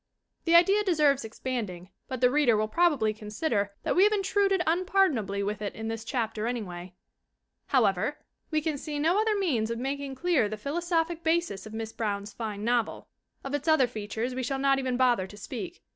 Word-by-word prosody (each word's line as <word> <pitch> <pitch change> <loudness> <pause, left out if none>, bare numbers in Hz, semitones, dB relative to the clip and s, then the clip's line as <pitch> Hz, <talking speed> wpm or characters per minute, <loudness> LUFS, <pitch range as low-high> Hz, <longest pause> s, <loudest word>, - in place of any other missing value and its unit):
The 335 0 +4
idea 390 +5 +6
deserves 300 -7 +3
expanding, 220 -6 -5 0.2
but 260 -2 -5
the 250 0 +5
reader 270 -6 +4
will 215 0 +1
probabjy 260 -6 +2
consider 210 0 -1
that - - 0
we 365 - +5
have 420 - +5
intruded 390 -2 +2
unpardon 370 -3 +2
ably 200 -1 -3
with 205 +1 -3
it 205 - -4
in 220 0 -4
this 225 0 -4
chapter 225 -3 -2
anyway. 185 -7 -5 0.7
However, 220 +1 +2 0.3
we 310 -1 +1
can 305 -2 -2
see 295 0 -5
no 335 +8 +3
other 435 -1 +1
means 260 - 0
of 230 - -2
making 270 +2 -3
clear 310 -7 +2
the 215 - -5
philosophic 335 - -1
basis 320 - 0
of 215 - -9
Miss 225 0 -5
Brown's 205 -2 -3
fine 210 -2 -5
novel. 235 -1 -1 0.3
Of 275 - -5
its 290 +2 -2
other 315 -5 +5
fea 215 -4 -6
tures 230 +4 -3
we 260 - -3
shall 270 +2 -2
not 275 0 +3
even 255 -2 -1
bother 245 -7 +3
to 205 - -13
speak. 340 - -7
255 Hz, 195 wpm, -28 LUFS, 215-325 Hz, 0.7 s, idea